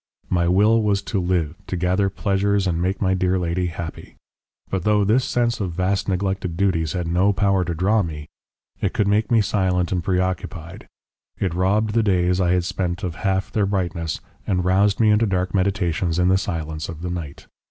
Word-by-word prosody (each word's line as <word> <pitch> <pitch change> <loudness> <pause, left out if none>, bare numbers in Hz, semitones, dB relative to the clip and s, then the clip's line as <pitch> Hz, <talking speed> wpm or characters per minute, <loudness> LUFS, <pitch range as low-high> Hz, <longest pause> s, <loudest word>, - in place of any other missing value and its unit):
My 85 -1 +2
will 105 +5 +4
was 100 -2 +1
to 100 - -2
live, 85 -4 0
to 95 - -3
gather 90 +3 +1
pleasures 100 0 0
and 85 -2 0
make 95 +3 -1
my 95 0 +2
dear 95 0 +1
lady 90 0 -1
happy. 85 -2 -7 0.5
But 95 -3 -2
though 105 0 +3
this 115 +6 +3
sense 120 -2 0
of 95 -5 -3
vast 95 +3 0
neglected 95 -2 -2
duties 85 -6 +1
had 90 -2 -2
no 90 +4 +3
power 100 -2 +2
to 85 -1 -3
draw 100 +6 +2
me, 75 -5 -6 0.5
it - - 0
could 105 - +1
make 105 +1 +2
me 115 -2 +4
silent 95 -3 0
and 90 -3 -1
preoccupied, 90 -2 -3 0.5
it 95 -4 -1
robbed 100 +4 +1
the 115 - +3
days 90 -3 +2
I 90 - +2
had 90 -1 +1
spent 90 -1 -3
of 90 -3 -2
half 95 +2 -1
their 105 -3 +1
brightness 85 -5 -2 0.3
and 90 -2 0
roused 100 +2 +3
me 110 -2 +4
into 110 +2 +3
dark 95 -1 -1
meditations 90 -3 0
in 90 0 +3
the 95 - +4
silence 80 -4 -4
of 85 0 -8
the 90 - -3
night. 80 -5 -6
95 Hz, 195 wpm, -22 LUFS, 85-100 Hz, 0.5 s, will